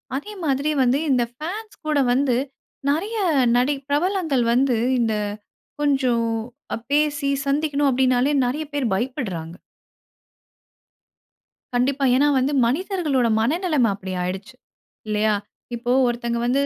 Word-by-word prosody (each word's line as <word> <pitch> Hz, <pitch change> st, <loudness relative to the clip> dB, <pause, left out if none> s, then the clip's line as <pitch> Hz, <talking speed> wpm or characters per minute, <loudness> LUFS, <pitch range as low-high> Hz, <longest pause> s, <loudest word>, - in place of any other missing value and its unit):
அதே 415 Hz, +10 st, -5 dB
மாதிரி 280 Hz, 0 st, 0 dB
வந்து 255 Hz, +3 st, +3 dB
இந்த 250 Hz, -2 st, +3 dB
ஃபான்ஸ் 385 Hz, -, -6 dB
கூட 300 Hz, -2 st, +1 dB
வந்து 255 Hz, -1 st, +2 dB, 0.5 s
நெறைய 400 Hz, +10 st, -1 dB, 0.4 s
நடி 255 Hz, +4 st, +2 dB
பிரபலங்கள் 315 Hz, -4 st, +1 dB
வந்து 255 Hz, -1 st, +2 dB, 0.2 s
இந்த 225 Hz, -2 st, +1 dB, 0.7 s
கொஞ்சம் 255 Hz, -5 st, +2 dB, 0.5 s
அ -, -, -4 dB
பேசி, 290 Hz, -1 st, +1 dB, 0.2 s
சந்திக்கணும் 285 Hz, 0 st, +1 dB
அப்படின்னாலே 255 Hz, +1 st, +2 dB
நெறைய 285 Hz, +6 st, -1 dB
பேர் 285 Hz, -3 st, 0 dB
பயப்படுறாங்க. 190 Hz, -, -3 dB, 2.2 s
கண்டிப்பா. 265 Hz, +3 st, +1 dB
ஏன்னா 290 Hz, +3 st, +4 dB
வந்து 265 Hz, +3 st, +1 dB
மனிதர்களோட 300 Hz, -, 0 dB
மனநிலைமை 300 Hz, -, +1 dB
அப்படி 190 Hz, -1 st, -7 dB
ஆயிடுச்சு, 195 Hz, +7 st, -5 dB, 0.5 s
இல்லையா. 215 Hz, 0 st, +1 dB, 0.4 s
இப்போ 240 Hz, +1 st, -2 dB, 0.2 s
ஒருத்தங்க 235 Hz, 0 st, -2 dB
வந்து 270 Hz, +3 st, +2 dB
265 Hz, 110 wpm, -22 LUFS, 240-295 Hz, 2.2 s, ஏன்னா